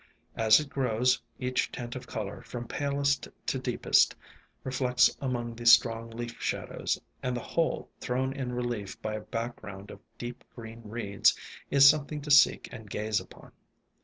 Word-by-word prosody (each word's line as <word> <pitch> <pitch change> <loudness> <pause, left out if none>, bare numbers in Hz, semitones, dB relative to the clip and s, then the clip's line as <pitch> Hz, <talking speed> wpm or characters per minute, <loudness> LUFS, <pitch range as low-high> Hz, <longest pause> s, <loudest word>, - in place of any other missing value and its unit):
As 110 -1 +6
it 150 - -4
grows, 125 -1 +1 0.2
each 125 0 -1
tint 120 -1 -6
of 125 0 -7
color, 105 -3 -5
from 120 -1 -7
palest 140 -1 0 0.2
to - - -1
deepest, - - +3 0.5
reflects 125 -1 +2
among 120 -3 -2
the 120 +1 -5
strong 115 -1 +5
leaf 115 +1 -7
shadows, - - -2 0.2
and 125 0 -1
the - - -4
whole, 165 +6 -1
thrown 130 +1 -1
in 130 -3 -4
relief 120 -5 -4
by 110 - -2
a 110 - -3
background 105 -4 -6
of - - -11 0.2
deep 120 0 -7
green 115 -1 -9
reeds, 105 -2 +1 0.3
is 140 0 +7
something 150 +1 +3
to 150 +1 -4
seek 140 - +6
and 110 -4 -10
gaze 105 +2 -1
upon. - - -14
120 Hz, 160 wpm, -29 LUFS, 115-130 Hz, 0.5 s, is